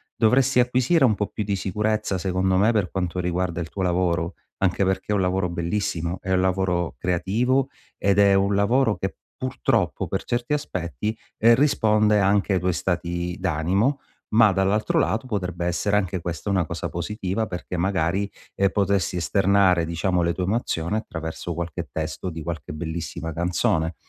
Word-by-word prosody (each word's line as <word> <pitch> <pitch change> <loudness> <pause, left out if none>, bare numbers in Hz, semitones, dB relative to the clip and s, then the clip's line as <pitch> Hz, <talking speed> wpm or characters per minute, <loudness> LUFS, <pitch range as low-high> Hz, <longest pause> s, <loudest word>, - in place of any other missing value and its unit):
Dovresti 125 +3 +3
acquisire 125 +6 +2
un 115 -5 +4
po' 105 0 -1
più 105 - -4
di 100 -1 -1
sicurezza 105 +1 -1
secondo 95 0 0
me 105 +4 +4
per 105 -6 0
quanto 90 -2 -2
riguarda 90 0 -1
il 80 - -5
tuo 95 - -5
lavoro, 90 -1 0 0.2
anche 95 +1 +1
perché 95 0 -1
è - - +3
un 100 - +2
lavoro 90 0 0
bellissimo, 85 0 -2
è 95 - -4
un 95 - +3
lavoro 90 -2 0
creativo 120 +10 +1 0.3
ed 100 0 +2
è 100 -1 +6
un 100 +1 +2
lavoro 110 +3 +3
che 95 - -4 0.2
purtroppo, 130 -1 -1
per - - -2
certi 120 +4 -1
aspetti 100 - -3 0.2
risponde, 110 -3 +4
ehm, 100 - +3
anche 100 +1 +2
ai 95 - +2
tuoi 90 0 +1
stati 85 0 -2
d'animo, 95 - +1 0.3
ma 110 -2 +6
dall'altro 95 +3 +1
lato 115 +4 +1
potrebbe 90 -6 -3
essere 90 +4 +1
anche 95 -3 -1
questa 85 +3 -4
una 95 -3 +2
cosa 85 +2 -4
positiva 95 +4 -2
perché 90 -1 -6
magari, 95 +2 0 0.2
ehm, 100 0 +3
potresti 100 -3 0
esternare, 95 -1 +3
diciamo, 90 +2 0
le 85 0 +1
tue 90 0 -2
emozioni 95 -3 -1
attraverso 80 -3 -5
qualche 85 -1 -5
testo 80 +3 -4
di 80 -1 -6
qualche 85 -1 -5
bellissima 80 0 -5
canzone. 85 -1 0
95 Hz, 165 wpm, -24 LUFS, 85-105 Hz, 0.3 s, è